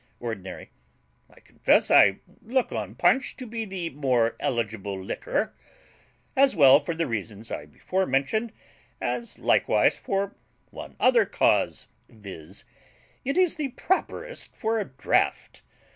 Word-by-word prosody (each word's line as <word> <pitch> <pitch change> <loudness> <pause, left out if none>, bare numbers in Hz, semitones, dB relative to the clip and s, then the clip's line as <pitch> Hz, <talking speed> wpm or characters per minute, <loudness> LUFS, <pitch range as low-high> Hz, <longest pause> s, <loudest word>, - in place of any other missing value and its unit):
ORDINARY. 110 -6 -7 0.6
I - - -20
confess - - +2
I - - +6 0.2
look 250 +1 0
on 105 -1 -4
punch 180 - +2
to 255 - -7
be 225 -1 -4
the 185 -4 -5
more 125 -5 +1
eligible 105 -5 -2
liquor, 95 - -2 0.8
as 270 -3 +4
well 140 -3 +7
for 160 +3 -4
the 165 0 0
reasons 110 -2 -5
I - - -5
before 190 0 -2
mentioned 215 - 0 0.5
as 235 -1 -4
likewise - - +2
for 195 0 -2 0.4
one - - -9
other 485 -1 +5
cause, - - +1 0.2
viz., 95 -6 -11 0.6
it 275 +6 -2
is 365 -3 +3
the 280 -5 -3
properest 475 - -3
for 225 0 -1
a 205 - -2
DRAUGHT. 130 - -1
165 Hz, 130 wpm, -26 LUFS, -, 0.8 s, well